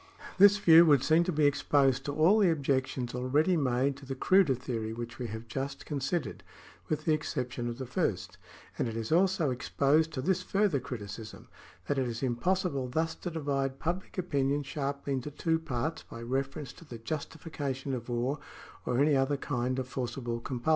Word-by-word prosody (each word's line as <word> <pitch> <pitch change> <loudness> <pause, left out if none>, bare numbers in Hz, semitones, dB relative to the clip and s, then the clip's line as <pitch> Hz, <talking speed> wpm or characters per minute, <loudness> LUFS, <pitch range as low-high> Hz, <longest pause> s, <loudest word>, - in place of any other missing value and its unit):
^ - - -24
This 205 +1 +8
view 170 -4 +8
would 140 -4 +5
seem 160 +4 +4
to 180 - 0
be 150 -2 +2
exposed 135 -2 +2
to 145 - -3
all 170 +8 +5
the 195 -4 +5
objections 135 -5 -1
already 140 +8 +2
made 135 -2 +1
to 140 - -12
the 135 - -3
cruder 185 -1 +4
theory 115 -3 -4
which 120 +1 -7
we 125 - -3
have 110 +2 -7
just 135 +4 -4
con 145 -2 -3
sidered, 135 - -2 0.5
with 155 0 -2
the 160 - +3
exception 125 -5 -2
of 120 - -5
the 130 - -5
first; 95 - -2 0.4
and - - +1
it 115 0 -4
is 115 +3 -4
also 180 -3 +3
exposed 145 +5 +1
to 130 - -2
this 185 +3 +1
further 195 -5 +1
criticism, 110 -3 -8 0.4
that 140 +5 0
it 130 - 0
is 120 +2 -4
impossible 140 +2 0
thus 160 +5 -1
to 175 - -6
divide 140 -4 -2
public 175 +7 -4
opinion 145 -5 0
sharply 140 0 -3
into 130 +2 -3
two 160 +2 0
parts 160 0 -3
by 115 - -11
reference 135 +3 -3
to - - -15
the 125 -7 -9
justification 140 0 -4
of 120 -1 -5
war 125 +5 -1 0.5
or 125 - +1
any 145 +1 +4
other 135 +2 +2
kind 130 -2 -2
of 130 -1 -2
forcible 120 -2 -3
compulsion. 125 +4 -4
135 Hz, 190 wpm, -30 LUFS, 125-155 Hz, 0.5 s, This